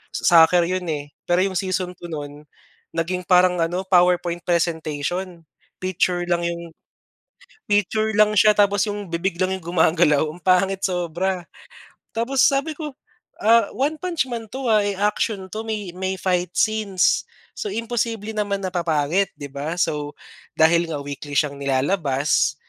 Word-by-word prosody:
Sa 165 -2 +6
soccer 175 0 +3
'yon, 185 -1 -2
eh, 145 -2 -4 0.2
pero 175 +2 +3
yung 195 -1 -2
Season 185 -1 -2
2 175 - -9
no'n, 145 0 -7 0.5
naging 180 +2 -2
parang 180 0 +4
ano, 175 +3 -2
PowerPoint 175 -2 +2
presentation. 170 +1 -2 0.4
Picture 180 -1 0
lang 170 0 +1
yung 170 -1 -4 1.0
picture 215 +2 +1
lang 215 0 +4
siya 210 +2 +7
tapos 205 0 +3
yung 205 -1 -5
bibig 170 +2 -2
lang 185 0 +1
yung 185 - -12
gumagalaw, 160 -3 +4
ang 160 +4 -9
pangit 190 +1 +2
sobra. 180 0 -1 0.7
Tapos 250 +4 +1
sabi 280 +3 +1
ko, 300 -1 -6 0.5
ah, 230 +2 +4
One 285 +5 0
Punch 340 -7 -1
Man 230 -4 -6
'to, 265 -1 -4
ah. 215 -2 +4
Eh, 205 0 -1
action 205 -1 -1
'to, 220 +1 -4
may 210 -5 -4
may 190 0 -2
fight 180 -2 0
scenes. 215 -4 +1 0.3
So, 425 - -3
imposible 230 - -2
naman 200 -2 -2
na 185 - -2
papangit, 170 +1 0
'di 145 -1 -7
ba? 145 +4 -4
So, 150 -2 -1 0.4
dahil 170 +1 +4
nga 145 - -3
weekly 145 0 -7
siyang 140 0 +1
nilalabas, 140 -1 +1
180 Hz, 155 wpm, -22 LUFS, 165-205 Hz, 1.0 s, siya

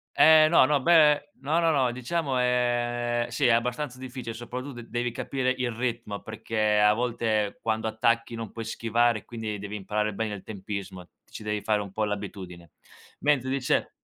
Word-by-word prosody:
Eh 155 0 +7
no, 155 -4 +6
no, 150 -1 +2
beh 150 -1 +4
no, 150 +5 +1
no, 165 -1 +3
no, 130 -5 +2
diciamo 130 +3 -2
è 120 -1 +1
sì 135 - +2
è - - +4
abbastanza 125 +3 -1
difficile, 125 -3 -7
soprattutto 120 +2 -7
devi 120 +1 -2
capire 130 +2 -2
il 125 -1 -1
ritmo, 115 -3 -3
perché 110 -1 0
a 105 0 +5
volte 110 -3 -1
quando 110 0 -1
attacchi 115 +1 0
non 115 -3 -6
puoi 115 - -6
schivare, 115 0 0
quindi 110 -3 -5
devi 105 +1 -6
imparare 105 +1 -2
bene 105 +1 -3
il 95 - -10
tempismo, 100 -2 -6
ti - - -35
ci - - -7
devi 105 -1 -2
fare 105 -1 +1
un 100 -2 -7
po' 110 +3 -2
l'abitudine. 95 -5 -6 0.5
Mentre 140 -3 +2
dice 130 -1 0
120 Hz, 175 wpm, -27 LUFS, 105-125 Hz, 0.5 s, Eh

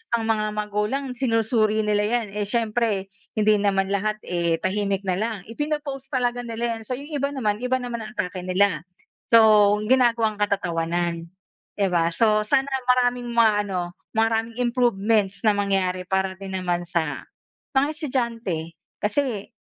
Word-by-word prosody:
ang 230 - -1
mga 220 -1 +1
magulang 210 +6 -1
sinusuri 225 -3 +2
nila 210 0 +2
'yan. 235 0 0
Eh, 205 -1 -2
siyempre 220 -4 0 0.2
hindi 215 0 +4
naman 195 -1 +1
lahat, 215 +2 0
eh, 170 -2 0
tahimik 200 0 0
na 185 - +1
lang. 220 0 -1
Ipino-post 290 0 -3
talaga 245 -1 0
nila 230 0 -2
'yan. - - -10
So, - - -2
'yong 290 +3 -10
iba 280 0 0
naman, 210 -4 0
iba 250 +1 +1
naman 240 -1 -4
ang 230 - -10
atake 180 0 -3
nila. 185 -4 +2 0.5
So, 215 -3 +7 0.2
ginagawang 235 -4 +3
katatawanan, 170 -4 -1 0.5
di 200 - +3
ba? 170 -1 +2
So, 215 +1 +3
sana 270 +4 +2 0.2
maraming 245 -1 +2
mga 230 -2 +6 0.2
ano, 190 -2 -2 0.4
maraming 225 +1 +1
improvements 225 -5 +1
na 210 - +5
mangyari 190 -2 0
para 190 0 0
din 195 -1 -7
naman 175 -1 -1
sa 165 -4 -2 0.5
mga 270 +2 +4
estudyante. 230 - -3 0.3
Kasi, 215 -1 -1
215 Hz, 150 wpm, -24 LUFS, 195-240 Hz, 0.5 s, So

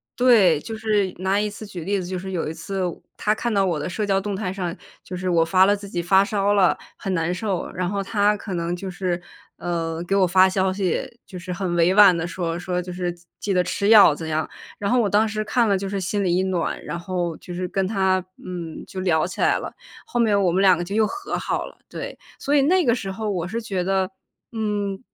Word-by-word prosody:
对， 215 -11 +5
就 220 +8 -6
是 210 -3 0
拿 190 +2 +1
一 210 - 0
次 210 +1 -8
举 180 -4 -7
例 200 +2 0
子， 175 - -6
就 185 0 -3
是 190 +1 -6
有 170 -4 -2
一 - - -5
次 195 +3 -4 0.4
她 210 0 +1
看 235 +1 -2
到 200 -1 +3
我 175 -5 0
的 145 - -3
社 185 +4 -3
交 195 -2 +2
动 200 0 -3
态 190 -2 -3
上， 180 -2 -3 0.3
就 180 - -7
是 180 0 -2
我 165 -2 +3
发 185 +2 +5
了 205 - +4
自 200 0 -9
己 175 -3 -3
发 190 +3 +4
烧 205 -1 +1
了， 190 -3 +4 0.2
很 195 - -3
难 165 -1 0
受， 185 0 -2
然 180 0 -2
后 200 +2 -1
她 205 +1 +2
可 200 -2 -6
能 170 0 -2
就 190 +2 -6
是， 180 -1 -2 0.4
呃， 165 -1 -3
给 195 - +1
我 195 -1 +4
发 185 +1 +5
消 190 0 +1
息， 195 +4 -2
就 185 - -9
是 180 +1 -5
很 180 -1 -2
委 170 +2 +4
婉 195 -3 +7
地 165 - -2
说 170 -1 -3
说 180 0 -2
就 180 +1 -7
是 175 -1 -3 0.3
记 200 - -1
得 180 -1 +3
吃 200 +3 -1
药 210 -9 +8
怎 160 +1 -6
样。 155 0 -1 0.3
然 200 - -1
后 250 - +4
我 225 - +2
当 210 +2 +3
时 215 0 -2
看 230 +1 +1
了 200 - +3
就 195 +1 -4
是 195 0 -3
心 200 +2 -1
里 175 -2 +2
一 185 - +2
暖， 185 -3 -2
然 170 - -5
后 175 -2 -3
就 180 - -9
是 180 +1 -3
跟 195 +2 -1
她， 190 -2 +2 0.3
嗯， 170 -3 -6
就 190 - -7
聊 170 -3 +2
起 185 - -9
来 - - +3
了， - - -6 0.4
后 240 - -2
面 210 -4 +3
我 180 -3 +3
们 190 +3 +2
2 190 -2 +7
个 175 - -3
就 195 +4 -5
又 220 0 +4
和 395 - -4
好 - - -2
了， - - -15
对。 - - -7 0.2
所 285 - 0
以 280 - +5
那 360 +5 +3
个 235 -5 +3
时 195 -5 -4
候 215 +2 -3
我 180 -4 -2
是 225 +5 -3
觉 195 -5 -2
得， 190 0 +1 0.4
嗯， 205 -3 -2
190 Hz, 270 characters per minute, -23 LUFS, 180-205 Hz, 0.4 s, 药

